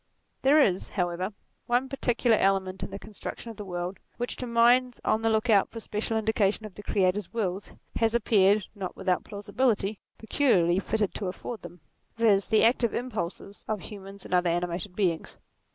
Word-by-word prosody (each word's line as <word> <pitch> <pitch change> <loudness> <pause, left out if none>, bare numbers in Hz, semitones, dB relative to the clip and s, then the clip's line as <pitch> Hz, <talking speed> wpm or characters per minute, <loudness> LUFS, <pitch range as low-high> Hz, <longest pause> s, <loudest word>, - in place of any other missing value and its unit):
There 285 +3 +5
is 190 -10 +2
however 180 +1 -2 0.4
one 245 +2 +2
particular 245 -3 +2
element 190 -1 +1
in - - -4
the - - -6
construction 215 +3 -7
of 225 - -13
the 210 - -6
world, 180 0 -4 0.2
which 245 0 -2
to 250 - -4
minds 240 +2 +4
on 215 +1 +2
the 225 - +2
look 220 +2 +1
out 205 -4 +4
for 230 - -7
special 220 +1 -2
indication 220 -1 +1
of 210 - -9
the 205 - -9
Creator's 195 -1 0
will, 195 -5 -1 0.4
has 225 0 +2
appeared, 205 -3 +4
not 195 -4 -6
without 180 -1 0
plausibility, 205 0 -1 0.2
peculiarly 190 -8 +2
fitted 210 0 -1
to 200 - -4
afford 215 +5 -6
them; 175 -1 -11 0.4
viz. 210 -4 +3
the 220 -1 +4
active 235 0 +3
impulses 205 -4 -5
of 215 -3 -2
human 195 0 -9
and - - -7
other 180 -1 +3
animated 175 +2 -2
beings. 175 -6 -1
210 Hz, 175 wpm, -27 LUFS, 185-230 Hz, 0.4 s, There